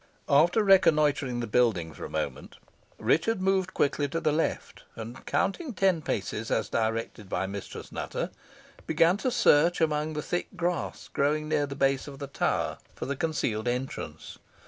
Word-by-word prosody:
After 170 +9 +4
reconnoitring 150 -9 +4
the - - -2
building 105 -8 +1
for - - -10
a - - -7
moment, - - -4 0.4
Richard 225 +6 +2
moved 190 0 +1
quickly 145 0 +1
to 165 +4 -2
the 155 -2 +1
left, 160 +2 -2
and 115 +2 -8
counting 215 - -1
ten 185 -4 +2
paces, 110 -3 -3
as - - 0
directed 115 -2 -2
by 95 - -1
Mistress 100 0 -7
Nutter, - - -3 0.6
began 165 +4 +4
to 255 - 0
search 170 -6 +4
among 155 -1 +1
the 150 -1 -3
thick 175 - -2
grass 175 -2 -2
growing 150 +2 0
near 145 -2 +1
the 140 - -6
base 135 0 +1
of 140 -1 -8
the 140 - -5
tower 140 - -1 0.2
for - - -5
the 140 - -2
concealed 125 -8 -1
entrance. 125 +2 -4
150 Hz, 165 wpm, -28 LUFS, 125-170 Hz, 0.6 s, After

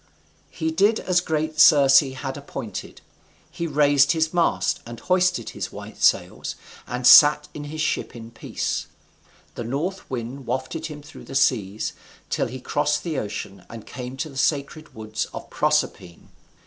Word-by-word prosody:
He 160 0 -3
did 200 +7 +3
as 180 -1 +1
great 155 -2 -2
Circe 140 -4 +8
had 135 -1 -4
appointed. 115 -7 -7 0.5
He 170 - -4
raised 145 -1 +4
his 160 0 0
mast, 170 -1 +1
and 115 -1 -9
hoisted 185 +2 +1
his - - -5
white - - -10
sails, - - +1 0.3
and 125 0 -4
sat 150 +3 +8
in 145 - -7
his 155 +2 -5
ship 155 - -2
in 115 0 -10
peace. - - -3 0.7
The - - -5
north 155 +11 -4
wind 125 +1 -6
wafted 130 +6 -3
him 150 -2 -9
through 150 - -13
the 135 - -9
seas, 110 -6 +1 0.4
till - - 0
he 130 +2 -7
crossed 150 +3 0
the 160 -5 -2
ocean, 100 -2 -6
and 115 -2 -10
came 125 +1 -7
to 155 +3 -3
the 135 - -11
sacred 145 +2 -1
woods 110 0 -4
of - - -8
Proserpine. 85 -2 -1
140 Hz, 160 wpm, -23 LUFS, 125-155 Hz, 0.7 s, Circe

